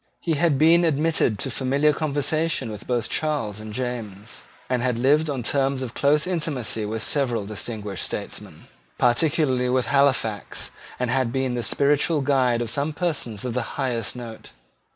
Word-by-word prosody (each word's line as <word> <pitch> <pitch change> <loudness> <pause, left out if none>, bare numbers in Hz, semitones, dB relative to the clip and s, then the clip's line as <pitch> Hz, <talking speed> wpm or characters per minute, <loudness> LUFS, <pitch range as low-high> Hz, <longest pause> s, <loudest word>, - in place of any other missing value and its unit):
He 170 - -2
had 155 -1 +2
been 165 +4 +5
admitted 155 -7 +2
to 130 - -2
familiar 140 +4 +2
conversation 155 -1 0
both 105 +2 -9
with 120 -3 0
Charles 140 -10 -1
and 110 0 -8
James, 115 -3 -5 0.2
had 125 -1 0
lived 150 +6 +3
on 135 -4 -2
terms 135 +1 +1
of 125 -2 -6
close 145 +2 +2
intimacy 150 -11 -1
with 110 0 -3
several 120 -7 +1
distinguished 105 -2 -4
statesmen, - - -6 0.3
particularly 130 0 +2
with 125 0 +2
Halifax, 130 -7 0 0.3
and 125 -1 0
had 130 -2 +1
been 130 -1 -1
the 120 - -1
spiritual 145 +5 +2
guide 130 -4 +2
of 115 - -4
some 145 +3 -1
persons 145 - -2
of 125 - -2
the 125 - 0 0.2
highest 125 -6 -2
note. 115 -3 -9
130 Hz, 155 wpm, -24 LUFS, 115-145 Hz, 0.3 s, been